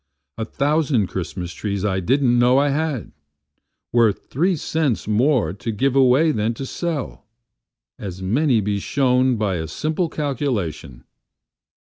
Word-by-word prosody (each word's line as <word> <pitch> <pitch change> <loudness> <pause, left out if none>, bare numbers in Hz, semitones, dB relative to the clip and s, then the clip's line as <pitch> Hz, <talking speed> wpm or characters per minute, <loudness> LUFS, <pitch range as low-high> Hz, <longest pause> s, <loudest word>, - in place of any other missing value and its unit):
A 110 - -1
thousand 140 -3 +1
Christmas 90 -1 -5
trees 100 -2 -3
I 95 -2 0
didn't 120 +5 +2
know 125 +2 +4
I 145 +1 +3
had! 145 -4 -2 0.8
Worth 115 -4 +2
three 175 +7 +2
cents 150 -7 -1
more 115 - +2
to 105 +4 -4
give 130 +5 0
away 135 +4 +5
than 110 -2 -1
sell, 140 -3 -4 0.7
As 95 -2 -6
may 115 +5 +2
be 100 0 -1
shown 130 +2 +2
by 105 -5 -1
a 80 -1 -4
simple 155 - -2
calculation. 110 - -3
125 Hz, 130 wpm, -21 LUFS, 100-145 Hz, 0.8 s, away